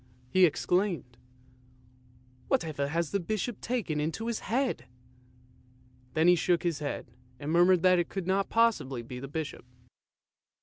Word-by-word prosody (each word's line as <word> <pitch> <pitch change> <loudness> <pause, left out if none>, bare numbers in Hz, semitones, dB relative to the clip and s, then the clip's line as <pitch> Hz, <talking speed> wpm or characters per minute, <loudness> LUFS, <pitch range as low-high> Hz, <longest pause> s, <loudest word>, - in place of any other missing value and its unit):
" 125 0 -30
he 185 -1 +7
exclaimed, 175 -5 -1 0.9
" 125 0 -30
whatever 150 -4 0
has 165 +1 -1
the 200 - +1
Bishop 215 +4 -3
taken 225 -11 -2
into 160 +9 -2
his 235 -1 -2
head? 255 +3 -1 0.7
" 125 0 -31
Then 160 +2 +4
he 180 - +8
shook 175 0 +1
his 170 -4 -1
head 145 -4 -5 0.3
and 145 +2 -4
murmured 175 +1 +5
that 185 -1 +5
it 175 - -1
could 195 -3 -4
not 195 +1 +1
possibly 210 - +1
be 125 +2 -7
the 135 - -6
Bishop. 150 -1 -5
165 Hz, 160 wpm, -29 LUFS, 130-190 Hz, 0.9 s, he